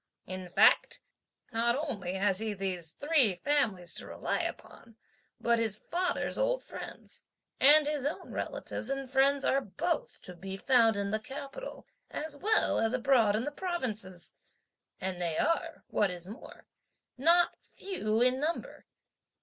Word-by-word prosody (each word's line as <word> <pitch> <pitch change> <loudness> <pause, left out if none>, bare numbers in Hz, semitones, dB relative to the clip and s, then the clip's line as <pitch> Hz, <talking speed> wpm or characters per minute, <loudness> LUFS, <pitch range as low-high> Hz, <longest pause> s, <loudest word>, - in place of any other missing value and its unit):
In 185 0 -6
fact, - - +4 0.5
not 235 +1 +2
only 220 - -3
has 195 0 +1
he 220 -1 -2
these 185 -4 -3
three 285 - +2
families 215 -11 0
to - - -2
rely - - -2
upon, 230 - -7 0.4
but 235 0 +3
his 220 -2 +2
(father's) 355 +8 -1
old - - +1
friends, - - -9 0.4
and 295 +3 +7
his 295 -2 -1
own 300 - -5
relatives 225 - -4
and 275 -1 -2
friends 275 +1 +3
are 275 - +3
both 320 - -3
to 180 - -9
be 190 +2 -7
found 230 -2 +4
in 200 0 -1
the 215 - +1
capital, 275 - -8 0.2
as 305 -1 -3
well 430 +9 +2
as 225 +1 +2
abroad 240 -5 +3
in 220 - 0
the 295 - -3
provinces; 230 - -4 0.7
and 185 -1 -4
they 165 -2 -1
are, 335 - 0
what 205 - +2
is 180 0 -6
more, 215 +6 -11 0.5
not 335 +6 +4
few 225 - -2
in 255 +1 +3
number. 320 +4 -3
240 Hz, 150 wpm, -31 LUFS, 200-290 Hz, 0.7 s, and